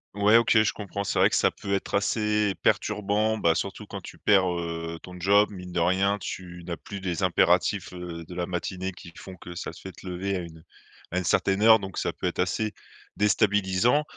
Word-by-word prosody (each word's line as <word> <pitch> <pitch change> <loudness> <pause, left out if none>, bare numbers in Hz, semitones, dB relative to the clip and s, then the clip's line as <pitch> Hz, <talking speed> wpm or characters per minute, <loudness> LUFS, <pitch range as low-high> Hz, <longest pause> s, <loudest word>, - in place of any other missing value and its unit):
Ouais, 105 +2 +5
OK, 115 -1 +4
je 110 - +1
comprends. 100 -1 -5
C'est - - -2
vrai - - +5
que - - +1
ça - - +4
peut 100 - -5
être 100 - -1
assez 105 0 +1
perturbant, 105 +2 +1
bah, 85 -3 +3
surtout - - -4
quand - - -6
tu - - -12
perds, 95 -3 +4
heu, 85 -1 -5
ton 90 0 -11
job, 100 +3 +4
mine 90 -3 -9
de 85 - -1
rien, 95 +4 +2
tu 90 -2 -7
n'as 85 -1 -3
plus 100 -2 -8
des 95 0 -2
impératifs, 90 0 +2
heu, 90 -2 -7
de 90 +2 -10
la 90 -1 -1
matinée 90 +1 -3
qui 85 -2 -12
font 95 - -10
que 85 0 -10
ça 85 - -5
te - - -13
fait 95 - -11
lever 95 +1 -3
à - - -1
une 80 -2 -10 0.5
à 90 - -2
une 90 - 0
certaine 95 +4 +1
heure. 110 0 +8
Donc 95 -2 -7
ça - - -1
peut - - -3
être - - -3
assez 105 +4 0 0.4
déstabilisant. 105 +5 +2
95 Hz, 215 wpm, -26 LUFS, 90-105 Hz, 0.5 s, heure